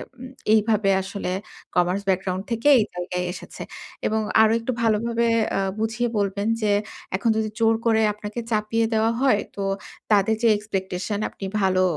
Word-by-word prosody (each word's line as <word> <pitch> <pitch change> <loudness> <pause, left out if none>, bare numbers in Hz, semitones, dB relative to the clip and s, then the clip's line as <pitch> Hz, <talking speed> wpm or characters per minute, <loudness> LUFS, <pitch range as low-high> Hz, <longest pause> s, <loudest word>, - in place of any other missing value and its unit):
ওম 255 +1 -9 0.2
এইভাবে 215 -2 +3
আসলে 195 -1 -4 0.4
commerce 180 +2 +2
background 185 0 0
থেকে 230 +4 0
এই 215 - +2
জায়গায় 180 0 -3
এসেছে। 185 - -9 0.4
এবং 220 0 0 0.2
আরো 220 0 +5
একটু 230 +3 -2
ভালোভাবে 230 +1 +1 0.3
আ - - +2 0.2
বুঝিয়ে 230 +2 0
বলবেন 200 0 -1
যে, 210 -1 +2 0.4
এখন 195 +4 0
যদি 220 -1 0
জোর 225 0 +4
করে 220 -1 +4
আপনাকে 210 +2 -6
চাপিয়ে 220 +1 +1
দেওয়া 220 +1 +3
হয় 260 -6 +4 0.2
তো 200 - -3 0.5
তাদের 210 +1 +4
যে, - - +6
এক্সপেকটেশন 195 -1 -3
আপনি 195 - -8 0.2
ভালো 185 -1 +3
210 Hz, 155 wpm, -23 LUFS, 195-225 Hz, 0.5 s, যে